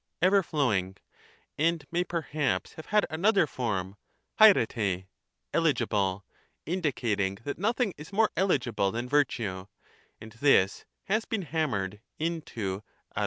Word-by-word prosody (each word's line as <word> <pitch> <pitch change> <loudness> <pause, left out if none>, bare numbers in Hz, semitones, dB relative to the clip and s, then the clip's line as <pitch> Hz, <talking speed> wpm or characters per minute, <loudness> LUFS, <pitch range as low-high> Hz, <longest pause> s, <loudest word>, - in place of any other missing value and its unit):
(ever 190 +3 +5
flowing), 105 - 0 0.6
and 165 +1 +1
may 175 +1 +1
perhaps 150 - -2
have 160 - -10
had 210 -1 +3
another 195 +3 +3
form, 105 -8 -3 0.4
alperi} 110 - +4 0.5
(eligible), 105 - +1 0.4
indicating 120 - -1
that 145 - -4
nothing 220 +1 +1
is 150 - -10
more 215 +2 +3
eligible 125 - +1
than 120 +3 -3
virtue, 115 -9 0 0.5
and 110 - -11
this 110 -7 +3 0.2
has 215 +3 0
been 220 -4 -2
hammered 130 - -2 0.2
into 120 - -3 0.3
dperrj. - - -1
140 Hz, 120 wpm, -28 LUFS, -, 0.6 s, ever